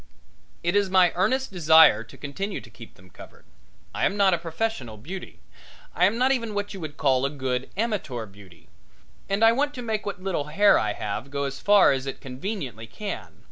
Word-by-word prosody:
It 175 +3 0
is 200 -1 +2
my 185 -2 +5
earnest 255 +9 0
desire 160 - +6
to 115 - -16
continue 195 +8 -5
to - - -15
keep 115 - -13
them 90 +1 -19
covered. - - -15 0.5
I - - -3
am 200 - -4
not 195 -2 +4
a 170 - +1
professional 165 - -4
beauty; 180 - -9 0.5
I 180 - +3
am 205 +5 +1
not 255 +2 +3
even 230 -5 -1
what 205 0 -3
you 195 - -8
would 155 -4 -7
call 130 -2 +2
a 140 - +1
good 130 -3 -3
amateur 195 - -2
beauty; 100 -4 -17 0.6
and 200 +3 +1
I 225 - +7
want 290 +4 0
to 250 - -6
make 220 -2 -2
what 200 -2 -4
little 185 -6 -2
hair 180 +8 +4
I 105 -1 -1
have 105 +7 -5
go 140 0 -3
as 140 0 -4
far 205 -1 +5
as 135 0 -2
it 135 - -5
conveniently 130 - -6
can. 205 - -7
175 Hz, 205 wpm, -25 LUFS, 130-205 Hz, 0.6 s, I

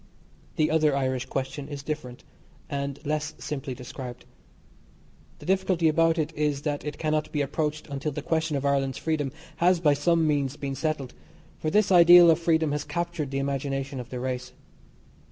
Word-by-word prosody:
The 155 -1 +2
other 155 -3 +3
Irish 130 -1 -1
question 135 +1 -4
is 145 -2 -7
different, 140 -5 -5 0.5
and 140 0 -3
less 150 +1 -2
simply 135 -3 -5
described. 125 0 -8 1.1
The - - -13
difficulty 185 -3 +2
about 165 +1 +3
it 155 0 -1
is 150 -2 -1
that 145 -2 -2
it 150 -1 -5
cannot 155 -1 -1
be 150 - 0
approached 150 +2 -2
until 140 +1 -3
the 145 +1 -5
question 160 -2 0
of 140 - -3
Ireland's 135 -1 +1
freedom 150 -4 -1 0.3
has 180 0 +4
by 150 -4 +4
some 165 +3 +2
means 145 -2 0
been 140 -1 -4
settled, 140 -3 -2 0.5
for 155 - -1
this 210 +3 +3
ideal 175 -1 +9
of 160 - +2
freedom 160 -2 +2
has 145 0 -1
captured 170 -4 -3
the 135 - -3
imagination 135 0 -2
of 125 -1 -7
the 125 - -5
race. 125 0 -4
150 Hz, 170 wpm, -26 LUFS, 135-160 Hz, 1.1 s, ideal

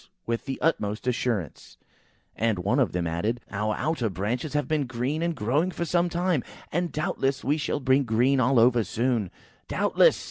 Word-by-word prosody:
with 115 0 -2
the 135 -1 -4
utmost 110 -9 0
assurance, 120 - -2 0.6
and 110 -1 +1
one 95 +3 +1
of - - +2
them 90 -1 -1
added, 100 +9 -1
"Our 105 +1 -1
outer 155 -8 0
branches 115 +10 -3
have 145 0 0
been 150 -4 0
green 130 +6 -2
and 170 -1 0
growing 145 +11 +1
for 175 -1 -3
some 175 +2 +1
time, 175 -5 0 0.3
and 175 0 -1
doubtless 140 -4 -1
we 145 +3 +1
shall 150 -1 -1
be 130 0 +3
green 130 +2 +2
all 125 +1 +3
over 120 0 +4
soon!" 115 -3 0 0.4
"Doubtless!" - - +3
125 Hz, 175 wpm, -26 LUFS, 110-150 Hz, 0.6 s, over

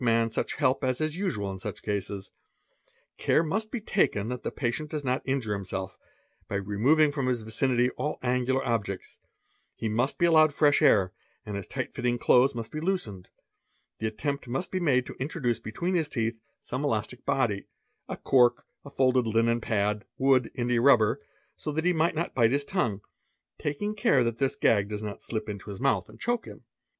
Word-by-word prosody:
man 115 -1 +2
such - - -2
help 130 - +1
as 130 -1 0
is 155 0 -1
usual 120 - -2
in 95 - -7
such - - -6
cases. 100 -1 -3 0.9
Care 160 - +3
must 215 +7 -2
be 245 - -3
taken 115 - +1
that 125 0 -4
th - - -5
patient 145 +4 -2
does 150 -1 -4
not 130 0 0
injure 130 -6 -1
himself, 95 -1 -4 0.5
by - - -4
removing 115 +11 +3
from 140 -3 -2
his 120 -3 0
vicinity 120 +3 +1
all 150 +3 -3
angular 125 +1 +1
objects; 105 -6 -3 0.6
he 115 - -3
must 120 +6 0
be 175 - +3
allowed 155 -2 +6
fresh 145 0 +3
air 95 -3 +4 0.3
and 105 - -5
his 100 -2 -5
tight - - -4
fitting 120 0 0
clothes 125 +2 +4
mus 115 -2 -4
be 155 - -6
loosened; 135 - -2 0.7
the 110 - -1
attempt 140 +5 -3
must 135 +9 -3
be 185 - -1
made 130 -7 +2
to - - -7
introduce 130 -4 -1
between 170 +12 -3
his: 165 -4 +1
cet 115 -1 0 0.3
some 130 +3 -4
elastic 125 -2 -2
body, 110 -7 0 0.4
a - - -4
cork, 120 -2 +3 0.2
a 140 - -10
folded 130 -3 +2
linen 115 +1 +2
pad, 105 -1 0
wood, 130 -3 +3
india 120 -1 +1
rubber, 120 -5 +5 0.3
so 150 - -4
t 150 - -1
na 160 - -2
he 180 - +4
may 160 +1 +2
not 170 - -2
bite 115 -3 +4
his 140 +1 0
tongue, 120 - -1 0.6
taking 180 +9 -2
care 140 -11 +3
that 115 -1 -2
this 135 -1 +1
gag 100 -2 +2
does 105 0 -4
not 105 -1 -6
slip 110 -2 -4
in 105 -2 -4
his 100 -2 -6
mouth 115 -10 +1
and 110 +1 -15
choke 240 0 -1
him. - - -11
125 Hz, 195 wpm, -28 LUFS, 110-145 Hz, 0.9 s, allowed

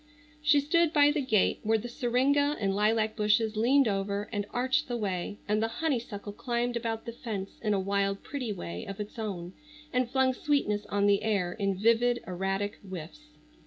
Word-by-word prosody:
She 300 -1 +5
stood 325 +3 +2
by 290 -1 +6
the 300 0 0
gate 220 -7 +2
where 220 +1 +2
the 225 +3 -5
syringa 280 +4 +1
and 195 -2 0
lilac 215 +1 +2
bushes 215 +1 +2
leaned 255 +5 +4
over 200 0 -1
and 205 -1 -2
arched 255 +2 0
the 240 -2 -2
way, 200 -2 -3
and 210 +1 +1
the 225 - +2
honeysuckle 230 -7 -3
climbed 240 +1 -2
about 225 -1 -3
the 235 - -4
fence 215 -5 -6
in 210 -2 +1
a - - +1
wild 195 0 0
pretty 260 -6 -4
way 85 - -5
of 195 - -7
its 210 +2 -6
own 185 -5 -4 0.4
and 250 -1 +1
flung 265 0 +2
sweetness 250 -8 0
on 200 +2 +1
the 200 -1 +4
air 200 -5 0
in 200 -2 -1
vivid, 230 +3 +3
erratic 195 +3 -2
whiffs. 190 - -9
220 Hz, 185 wpm, -29 LUFS, 200-250 Hz, 0.4 s, by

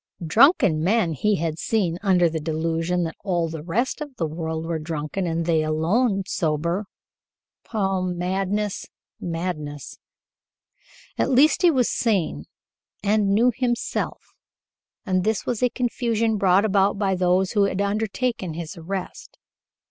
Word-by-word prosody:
Drunken 190 - +4
men 190 -2 +2
he 210 +8 +1
had 160 -2 -2
seen 185 -7 0
under 185 -4 +4
the 160 0 -2
delusion 165 +3 -1
that 165 -1 -4
all 175 -4 0
the 160 -1 -6
rest 230 - -1
of 290 -3 -7
the 165 - -1
world 160 0 -4
were 165 -1 -2
drunken 155 +3 -3
and 165 0 -1
they 160 -2 +2
alone 190 +8 +1
sober. 170 +3 -1 0.9
Oh, 195 -4 0
madness, 190 +3 -2 0.3
madness! 165 -4 -5 1.2
At - - +2
least 275 +4 +4
he 355 - +6
was 255 -7 +2
sane 180 - 0 0.6
and 205 0 +2
knew 240 +4 +4
himself, 245 -1 -2 0.7
and 185 -3 +1
this 220 +1 0
was 240 -3 -2
a 250 - +3
confusion 230 -3 0
brought 195 +1 +4
about 200 -1 +2
by 195 -1 +1
those 185 +1 +2
who 205 -2 +3
had 195 -1 -2
undertaken 205 -2 -1
his 165 -1 -6
arrest. 180 +3 -6
185 Hz, 140 wpm, -23 LUFS, 165-215 Hz, 1.2 s, he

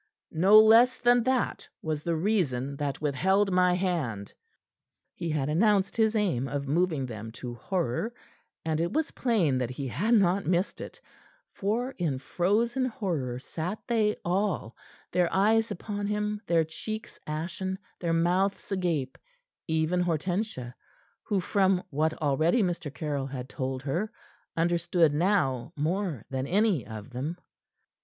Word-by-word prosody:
No 195 +6 +7
less 230 +4 +6
than 245 0 +4
that 260 -1 0 0.2
was 155 -2 -2
the 170 +1 -1
reason 155 - 0
that 145 0 -3
withheld 190 +8 +2
my 180 -1 +4
hand." 155 - -2 0.8
He 170 - -4
had 150 -3 0
announced 195 +5 +2
his 220 -1 +2
aim 175 - +1
of 140 0 -3
moving 155 -2 +1
them 110 -2 -7
to 120 0 -6
horror; 175 - -2 0.5
and 160 -1 0
it 170 +1 0
was 315 -1 0
plain 185 - +1
that 125 -2 -1
he 135 +2 -4
had 220 - +2
not 195 -3 +3
missed 180 +2 0
it, - - -9 0.5
for 230 +6 -1
in 155 -7 0
frozen 220 - +1
horror 175 - -2
sat 165 +9 -4
they 215 -3 +2
all, 180 - -1 0.4
their 180 -1 +2
eyes 220 +3 +3
upon 205 +2 -4
him, 210 0 -1
their 165 -1 +3
cheeks 215 +7 -7
ashen, 175 +5 -3 0.2
their 170 -2 -1
mouths 180 +5 +1
agape 170 -9 -1 0.5
even 160 +3 +1
Hortensia, 175 - -2 0.5
who 205 -3 0
from 190 0 +2
what 155 +2 +1
already 155 - +2
Mr. 175 -5 -2
Caryll 145 -3 -3
had 130 -2 -6
told 130 -1 -4
her, 175 +11 -1 0.5
understood 170 -1 +2
now 150 - +1
more 165 - -2
than 130 0 -2
any 195 - +2
of 110 +1 -8
them. 140 +8 -4
175 Hz, 140 wpm, -28 LUFS, 145-205 Hz, 0.8 s, No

